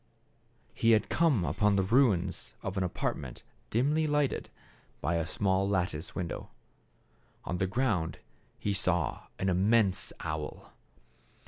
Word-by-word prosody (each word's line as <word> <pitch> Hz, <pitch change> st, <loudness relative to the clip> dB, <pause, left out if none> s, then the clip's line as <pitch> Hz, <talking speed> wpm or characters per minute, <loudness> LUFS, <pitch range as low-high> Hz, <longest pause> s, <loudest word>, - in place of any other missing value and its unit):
He 115 Hz, 0 st, +4 dB
had 110 Hz, -, +2 dB
come 150 Hz, -, +3 dB
upon 100 Hz, +7 st, +2 dB
the 95 Hz, -, +3 dB
ruins 95 Hz, -5 st, +2 dB
of 95 Hz, -, -3 dB
an 95 Hz, -, +1 dB
apartment 70 Hz, -7 st, -3 dB, 0.3 s
dimly 150 Hz, +7 st, +2 dB
lighted 145 Hz, -2 st, 0 dB, 0.5 s
by 80 Hz, +5 st, 0 dB
a 85 Hz, -1 st, 0 dB
small 95 Hz, +1 st, +1 dB
lattice 90 Hz, -4 st, -1 dB
window. 90 Hz, -2 st, -4 dB, 1.0 s
On 90 Hz, -, -2 dB
the 95 Hz, -, +1 dB
ground 100 Hz, -6 st, 0 dB, 0.4 s
he 100 Hz, -, -1 dB
saw 95 Hz, -4 st, 0 dB
an 95 Hz, -, -1 dB
immense 95 Hz, 0 st, +2 dB
owl. 75 Hz, -1 st, -5 dB
95 Hz, 125 wpm, -30 LUFS, 90-115 Hz, 1.0 s, He